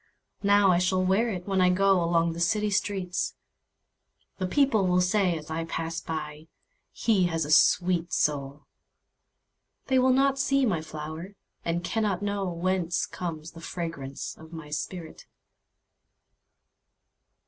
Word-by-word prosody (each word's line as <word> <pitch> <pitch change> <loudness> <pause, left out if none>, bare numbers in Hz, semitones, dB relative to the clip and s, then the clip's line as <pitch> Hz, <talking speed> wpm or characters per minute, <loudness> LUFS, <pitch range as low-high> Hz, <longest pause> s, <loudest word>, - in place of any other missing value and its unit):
Now 200 -1 +5
I 175 - +3
shall 185 +1 +1
wear 195 +6 +2
itWhen 190 +1 -1
I 180 - +5
goAlong 175 -3 +3
the 170 - -7
city 210 +5 +1
streets:The 190 -1 -5
people 225 -4 +2
will 180 0 +3
sayAs 180 -4 +1
I 165 +1 -2
pass 165 0 -4
by—"He 160 - -3
has 165 -3 -1
a 150 - -4
sweet 175 +1 +4
soul!"They 145 - -4
will 255 +1 +4
not 270 +1 +3
see 275 0 +2
my 180 -9 0
flower, 155 +5 -7 0.3
And 170 +1 -1
cannot 205 -1 -1
knowWhence 185 -3 -1
comes 165 -3 -5
the 165 - -12
fragrance 165 -6 -5
of 160 0 -13
my 160 -3 -9
spirit! 165 +2 -6
180 Hz, 115 wpm, -27 LUFS, 165-200 Hz, 0.3 s, Now